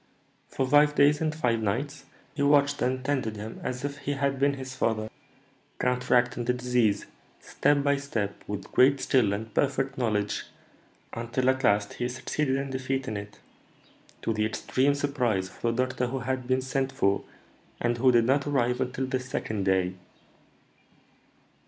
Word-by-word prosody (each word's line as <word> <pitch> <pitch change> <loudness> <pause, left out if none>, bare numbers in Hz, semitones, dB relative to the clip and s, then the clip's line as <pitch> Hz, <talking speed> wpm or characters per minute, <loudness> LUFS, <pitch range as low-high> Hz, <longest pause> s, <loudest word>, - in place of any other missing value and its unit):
"For 135 - -2
five 145 +2 +5
days 145 +1 +4
and 155 -1 0
five 120 -7 +1
nights 135 +7 -2 0.3
he 145 - -4
watched 145 0 +3
and 130 +1 -1
tended 130 -6 -1
him 105 +2 -7
as 125 +2 -4
if 140 0 -5
he 145 - -2
had 140 -1 -1
been 140 +1 +2
his 130 -1 -7
father, 110 -3 -1 0.7
counteracting 125 -1 +1
the 125 - +2
disease, 125 -5 +1 0.3
step 145 -1 +1
by 140 0 +2
step, 115 -8 -3
with 100 -2 -6
great 135 +2 +5
skill 125 -8 +2
and 110 +2 -4
perfect 135 -1 0
knowledge, 105 -4 0 0.7
until, 120 +3 +1
at 130 +1 -4
last, 100 -2 +2
he 125 - -2
succeeded 130 +2 -1
in 135 0 -3
defeating 130 -3 -2
it, 100 +1 -7 0.9
to 115 - 0
the 110 0 0
extreme 130 +6 +1
surprise 125 -10 0
of - - -18
the 115 - +1
doctor 130 -1 -2
who 130 +2 -3
had 130 0 -3
been 130 0 +2
sent 135 +1 -1
for, 100 -8 +1 0.6
and 120 0 0
who 130 +1 +5
did 120 -2 +4
not 140 +3 +2
arrive 125 -4 +1
until 130 +1 -2
the 130 0 -1
second 110 -5 -3
day." 95 -1 +2
130 Hz, 165 wpm, -27 LUFS, 115-140 Hz, 0.9 s, five